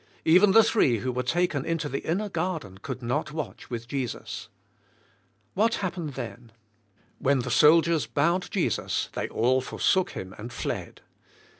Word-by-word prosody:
Even 185 +5 +6
the 225 +3 +7
three 135 - +3
who 130 +4 -2
were 125 +1 -1
taken 155 +1 0
into 165 -1 -2
the 140 - -3
inner 190 +6 -1
gar 180 -1 -1
den 95 -7 -13
could 130 +3 -6
not 130 +7 -1
watch 155 0 -6
with 120 -1 -5
Jesus. 130 -3 -4 1.0
What 225 +4 +2
happened 170 -7 -4
then? 115 0 -7 0.7
When 140 -2 +2
the 125 0 -4
soldiers 160 +5 +5
bound 170 +6 +1
Jesus 190 - -1
they - - -3
all 130 +3 +2
for - - -8
sook 185 -2 +2
Him 95 0 -7
and 115 +3 -7
fled. - - -5
150 Hz, 160 wpm, -27 LUFS, 125-175 Hz, 1.0 s, the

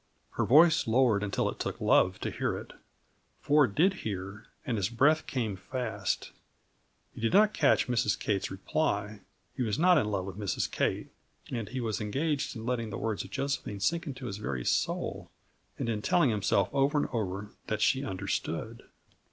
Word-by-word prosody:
Her - - -1
voice 160 +4 +6
lowered 115 -3 +3
until 105 -1 0
it - - -4
took - - -3
love 90 0 +3
to - - -2
hear - - -1
it. - - -9 0.7
Ford 145 -8 +3
did 185 +5 +4
hear, 100 -1 -5 0.2
and 125 -5 -1
his 100 -1 0
breath 145 +7 +3
came 115 -6 -2
fast. 125 +3 -3 0.8
He - - -10
did 115 - +1
not 210 +1 +5
catch 145 -4 +3
Mrs. 115 -4 +1
Kate's 100 -3 -1
reply; 105 0 -2 0.4
he 130 - -3
was 110 -4 0
not 175 0 +5
in 110 - -1
love 95 -3 -2
with 95 +1 -7
Mrs. 100 -2 -1
Kate, - - -1 0.4
and 115 -4 -3
he 130 - -4
was 110 -3 -2
engaged 140 +8 -1
in 110 -1 -7
letting 120 -2 -1
the - - -5
words 110 -2 -2
of - - -11
Josephine 135 -7 -3
sink 170 - 0
into 135 -2 -6
his 100 -4 -4
very 65 - -4
soul, - - -1 0.5
and - - -3
in 110 -2 -1
telling 145 +2 +3
himself 100 -2 +2
over 140 +2 +2
and 145 - +1
over 105 -2 -3 0.2
that 110 0 0
she 135 +1 +2
understood. 95 -9 -3
115 Hz, 180 wpm, -30 LUFS, 100-140 Hz, 0.8 s, voice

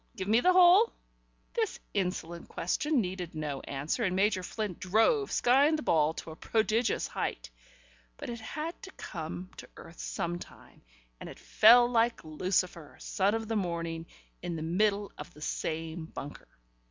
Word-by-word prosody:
Give 190 -4 -4
me 220 +3 +5
the 365 - +4
hole?" 370 +5 +7 0.6
This 450 -3 -1
insolent 180 -3 -3
question 290 - 0
needed 180 -3 -5
no 150 -3 -3
answer, 140 - -3
and 185 -3 0
Major 195 0 +2
Flint 205 0 -4
drove, 225 - +2
skying 275 +6 +4
the 305 - -3
ball 155 0 +2
to 160 - -7
a - - -9
prodigious 220 +4 +1
height. - - -4 0.7
But - - -6
it 235 - -6
had 310 +9 -5
to 380 - -10
come 175 +1 -7
to - - -10
earth 165 - -13
sometime, 175 +1 -6 0.4
and - - -8
it - - -10
fell 240 +3 +6
like 235 -1 +1
Lucifer, 170 0 -2
son 200 +3 0
of 225 -1 -3
the 225 - -2
morning, 170 -4 -3 0.3
in 170 - -4
the 155 - -4
middle 200 +4 +1
of 170 - -9
the 150 - -14
same 160 +1 -3
bunker.... 145 -3 -9
190 Hz, 160 wpm, -30 LUFS, 165-230 Hz, 0.7 s, hole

